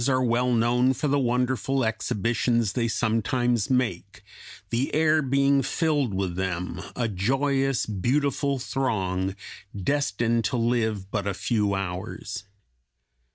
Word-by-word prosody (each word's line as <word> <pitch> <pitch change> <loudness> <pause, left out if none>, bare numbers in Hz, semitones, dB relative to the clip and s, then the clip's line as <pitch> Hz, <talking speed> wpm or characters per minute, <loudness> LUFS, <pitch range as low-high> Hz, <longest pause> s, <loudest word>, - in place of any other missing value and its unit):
183) 130 -2 +3
are 130 -1 +1
well 125 +2 +2
known 120 +2 +3
for 150 - -1
the 145 0 +2
wonderful 125 +1 0
exhibitions 115 0 0
they 115 -2 0
sometimes 115 +1 0
make, 105 -5 -1 0.5
the 120 +4 0
air 155 0 +4
being 140 0 +3
filled 145 - 0
with 95 -2 -2
them, 90 -1 -3
a 120 -2 0
joyous, 135 +6 +1
beautiful 140 +7 0
throng, 95 -8 -1 0.4
destined 115 0 0
to 115 +4 0
live 110 -4 0
but 100 -2 -2
a 100 - -1
few 105 -3 0
hours. 95 +1 -5
120 Hz, 125 wpm, -26 LUFS, 100-135 Hz, 0.5 s, air